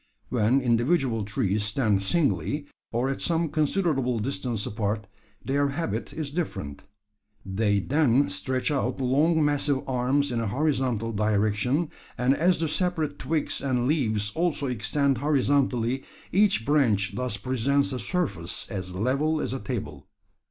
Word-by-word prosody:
When 125 +3 +2
individual 120 -1 +1
trees 105 0 0
stand 105 -2 +1
singly, 140 - 0 0.3
or 120 +3 0
at 135 - -2
some 165 -1 +1
considerable 150 -5 +1
distance 110 -1 -2
apart, 105 0 -2 0.4
their 140 +1 +1
habit 160 +4 -3
is 155 -3 -4
different. 75 - -4 0.6
They 100 +1 +1
then 140 +3 +3
stretch 130 +9 -1
out 135 -2 -1
long 150 +5 +3
massive 145 -2 0
arms 130 +2 +1
in 120 - -1
a 115 - -1
horizontal 130 -3 0
direction; 110 +8 +1 0.3
and 125 +2 +3
as 175 +4 +2
the 165 - +1
separate 160 -3 -1
twigs 155 +3 -1
and 125 -3 0
leaves 110 -9 +1
also 165 -4 0
extend 135 +2 0
horizontally, 135 -3 +1 0.3
each 195 - +3
branch 120 -10 +2
thus 125 -4 -2
presents 135 +5 +1
a 130 - -2
surface 120 - -2
as 90 -2 -4
level 140 +9 +1
as - - -2
a 135 - -3
table. 105 - -5
130 Hz, 140 wpm, -26 LUFS, 110-145 Hz, 0.6 s, then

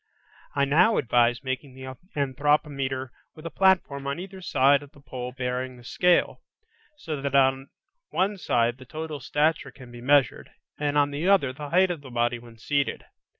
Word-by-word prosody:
I 140 -1 +3
now 180 +10 +4
advise 120 +1 +2
making 130 0 -4
the 130 0 -8 0.2
anthropometer 140 -1 0 0.3
with 155 - -13
a 165 - -4
platform 175 -8 +2
on 140 +3 -2
either 190 +1 -9
side 140 -3 +3
of 145 +1 -14
the 145 - -17
pole 125 -3 -6
bearing 125 0 -4
the 120 - -15
scale, 180 +8 +2 0.6
so 155 - -5
that 140 0 -2
on 135 0 +3 0.4
one 200 +2 0
side 120 -5 +1
the 130 - -12
total 155 +2 -6
stature 150 +4 0
can 125 -3 -14
be 120 0 -10
measured, 140 +1 +2 0.3
and 145 0 0
on 145 0 +3
the 150 +5 -2
other 160 -10 +3
the 145 +1 -7
height 185 +2 +3
of 165 -4 -5
the 135 - -11
body 120 0 0
when 115 -1 -15
seated. 140 +4 -1
140 Hz, 180 wpm, -26 LUFS, 130-150 Hz, 0.6 s, now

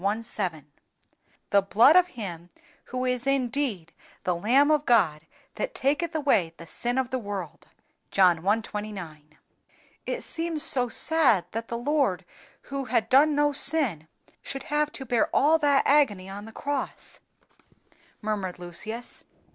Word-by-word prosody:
7,) 185 - -3 0.9
the 200 - +5
blood 225 - +5
of 365 0 +6
Him 175 -5 -6 0.4
who 255 0 -3
is 250 0 -1
indeed 250 - -1 0.3
THE 180 - 0
LAMB 260 - +3
OF 300 -1 0
GOD 160 -10 +2 0.3
THAT - - -4
TAKETH 300 +5 0
AWAY 240 - +1
THE 170 - -10
SIN 240 +9 -3
OF 260 -1 -1
THE 260 - -1
WORLD 200 -7 -7 0.4
(John 180 -4 +3
i. 215 +3 +3
29). 180 -9 -8 0.7
"It - - -3
seems 330 -2 -2
so 255 -6 +4
sad 265 - +2
that 225 +1 -4
the 235 - -4
Lord, 240 - 0 0.4
who 275 -1 -5
had 235 -3 0
done 290 +3 +5
no 290 0 +3
sin, 270 - +1 0.3
should 270 - -6
have 300 0 0
to 265 - -7
bear 240 -2 +1
all 315 +3 +4
that 285 -2 +3
agony 250 -11 +3
on 200 +2 -8
the 225 - -11
cross," 285 +4 -4 1.0
murmured 205 -4 -3
Lucius. 200 +7 -5
235 Hz, 145 wpm, -26 LUFS, 195-285 Hz, 1.0 s, of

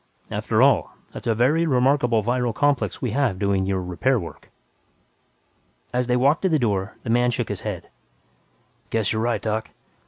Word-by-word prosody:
After - - +1
all, - - +3 0.2
that's - - -8
a 115 - +2
very 150 +9 +2
remarkable 125 -4 +2
viral 120 0 0
complex 145 -3 0
we 125 - -1
have 125 -6 0
doing 100 -1 0
your 95 -1 0
'repair' 115 +9 0
work." 85 - -10 1.4
As 125 0 0
they 125 0 +2
walked 140 +6 +3
to 190 - +1
the 160 - +3
door, 105 -5 -1
the 115 - -2
man 120 +1 +3
shook 120 - -2
his - - -4
head, - - -5 1.0
"Guess 110 -2 0
you're 110 - -1
right, 120 +1 -1
Doc. 110 0 -2
120 Hz, 175 wpm, -23 LUFS, 110-130 Hz, 1.4 s, all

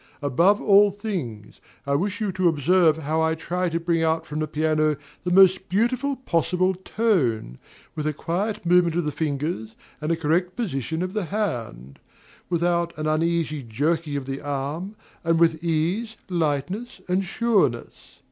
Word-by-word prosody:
Above 170 - +3
all 205 0 +6
things, 180 - -6 0.2
I 140 - 0
wish 200 +8 0
you 210 -3 -1
to 185 -1 +1
observe 165 +1 +3
how 160 +1 -1
I 160 0 +2
try 180 +2 -2
to 165 0 -1
bring 170 -1 0
out 160 0 +1
from 150 +1 -5
the 155 - -1
piano 155 0 +1 0.2
the 180 - -3
most 190 0 +5
beautiful 250 +8 +1
possible 185 -5 +1
tone, 175 - 0 0.4
with 155 -1 -2
a - - +2
quiet 185 +7 -3
movement 175 -1 +4
of 175 -2 0
the 150 - -1
fingers 145 -7 -3 0.3
and 155 +2 -1
a - - +3
correct 170 +3 0
position 160 - -2
of 185 +1 -4
the 210 -4 -1
hand; 115 - -4 0.5
without 170 -1 0
an 155 - -3
uneasy 155 -1 0
jerking 145 +6 -1
of 140 - -5
the 135 +1 -5
arm, 145 +8 -4 0.3
and 165 0 +2
with 165 -1 +3
ease, 175 +8 -1
lightness, 175 - -2
and 185 +2 +1
sureness. 190 - -1
165 Hz, 160 wpm, -24 LUFS, 150-185 Hz, 0.5 s, all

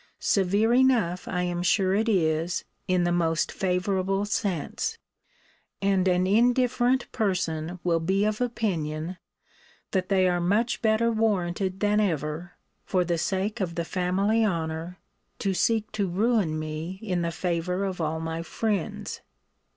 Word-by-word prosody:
Severe 200 +4 +2
enough 240 -9 +3
I 180 -1 -1
am 175 -1 -2
sure 190 +1 +2
it 220 +3 +1
is, 170 -2 +1 0.2
in 185 -1 +2
the 175 - +1
most 165 -2 +1
favourable 190 +1 0
sense. 215 - -2 0.8
And 195 -1 +2
an 180 0 +3
indifferent 245 +4 +2
person 175 -5 -1
will 170 -2 +2
be 190 +5 +1
of 215 +2 -1
opinion, 175 -8 -2 0.7
that 185 -2 -1
they 190 -2 +4
are 175 -1 +1
much 210 +7 +1
better 225 +1 +3
warranted 195 -4 0
than 210 0 +3
ever, 165 -3 -1 0.3
for 185 -2 +1
the 170 -1 0
sake 195 +5 -1
of 170 -3 -2
the 170 - -2
family 195 +6 +1
honour, 165 -2 -2 0.4
to 195 -2 -1
seek 225 +2 +1
to 205 -2 -1
ruin 200 -4 +1
me 155 +4 -5
in 180 -5 -1
the 170 0 -1
favour 180 +2 -1
of 185 -3 -3
all 160 0 -1
my 165 0 -3
friends. 200 +2 -3
185 Hz, 145 wpm, -26 LUFS, 170-210 Hz, 0.8 s, they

